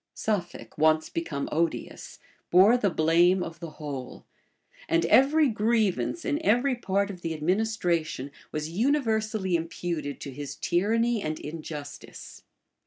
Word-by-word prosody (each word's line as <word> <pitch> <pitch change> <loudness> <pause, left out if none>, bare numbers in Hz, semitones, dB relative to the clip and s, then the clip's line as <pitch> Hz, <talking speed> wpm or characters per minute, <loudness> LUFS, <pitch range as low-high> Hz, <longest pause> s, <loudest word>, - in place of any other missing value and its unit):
Suffolk, 185 -6 -3
once 155 0 +3
become 160 -4 -3
odious, 165 +1 -2 0.3
bore 190 +7 +6
the 215 -5 +2
blame 175 +3 +3
of 165 0 -8
the 170 - -6
whole; 140 -4 -7 0.6
and 165 0 +2
every 285 - +5
grievance, 220 - 0
in 300 +2 -1
every 245 +4 +3
part 200 -4 -1
of 180 -3 -11
the 165 -1 -3
administration, 170 -5 -1 0.2
was 155 +1 -4
universally 220 - 0
imputed 165 -3 -3
to 140 - -7
his 145 +1 -6
tyranny 225 +5 +1
and 155 -2 -3
injustice. 150 -2 -8
175 Hz, 125 wpm, -27 LUFS, 155-220 Hz, 0.6 s, bore